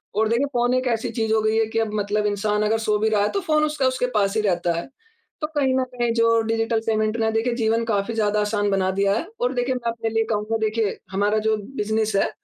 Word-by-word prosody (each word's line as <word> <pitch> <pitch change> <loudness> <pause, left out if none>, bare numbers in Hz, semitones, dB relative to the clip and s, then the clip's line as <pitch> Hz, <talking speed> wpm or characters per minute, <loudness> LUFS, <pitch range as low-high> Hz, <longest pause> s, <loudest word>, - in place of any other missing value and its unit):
और 220 +1 +2
देखिए, 235 +5 +2
फ़ोन 245 +1 +2
एक 255 0 0
ऐसी 225 - -4
चीज़ 220 0 +1
हो 220 - +3
गयी 220 +1 +1
है 225 - +3
कि - - +3
अब 220 -2 -1
मतलब 210 +1 -1
इंसान 210 +1 0
अगर 220 +1 +2
सो 210 0 +3
भी 220 - +2
रहा 210 -2 +2
है, 205 - +1
तो 400 - -1
फ़ोन 305 -4 +1
उसका 300 -3 0
उसके 255 -1 0
पास 200 +1 +1
ही - - +2
रहता 175 -4 0
है। - - -6 0.6
तो 305 - -1
कहीं 270 -2 +2
न 260 - +2
कहीं 240 -1 0
जो 230 0 +3
डिजिटल 225 0 0
पेमेंट 215 0 +1
ने 220 -1 +1
देखिए 225 +2 0
जीवन 225 -1 +1
काफ़ी 210 0 -1
ज़्यादा 210 -1 +1
आसान 205 0 0
बना 190 -1 +1
दिया 195 +1 +1
है। 335 - -4
और 250 +2 +1
देखिए 250 +1 0
मैं 235 -2 -2
अपने 225 -1 -3
लिए 225 0 +1
कहूँगा, 215 +1 -1
देखिए 220 -1 -1
हमारा 205 +2 +1
जो 220 - +3 0.2
बिज़नेस 220 0 0
है, - - +2
220 Hz, 255 wpm, -23 LUFS, 210-235 Hz, 0.6 s, हो